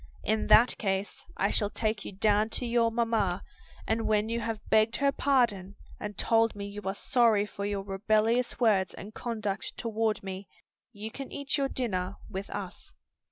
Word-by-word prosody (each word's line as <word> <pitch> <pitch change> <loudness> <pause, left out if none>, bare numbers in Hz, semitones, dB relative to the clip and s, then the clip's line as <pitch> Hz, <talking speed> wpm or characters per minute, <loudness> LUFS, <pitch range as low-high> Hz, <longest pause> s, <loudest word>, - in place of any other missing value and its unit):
In 220 0 0
that 235 +2 +6
case, 195 -1 -2
I 200 - +1
shall 205 - +1
take 215 -1 -2
you - - -6
down 210 +2 +2
to 250 - -1
your 235 -1 +2
mamma, 225 -6 0 0.4
and 225 0 0
when 215 0 +2
you 230 +1 -1
have 225 -1 -4
begged 220 +1 +3
her 280 -1 +2
pardon 235 -9 +1 0.2
and 210 -1 -6
told 225 -1 +2
me 200 0 -5
you 200 +1 -7
are 195 +1 -1
sorry 225 -4 +3
for 200 0 -5
your 200 -1 -2
rebellious 215 +5 +1
words 205 -6 +2
and 210 +2 -9
conduct 215 -5 -4
toward 225 -2 -1
me, 190 0 -6 0.4
you 215 0 -7
can 275 +2 -7
eat 280 -1 -2
your 275 -2 0
dinner 195 -8 -2 0.2
with 190 +1 -5
us." 195 -2 -7
215 Hz, 175 wpm, -29 LUFS, 200-230 Hz, 0.4 s, that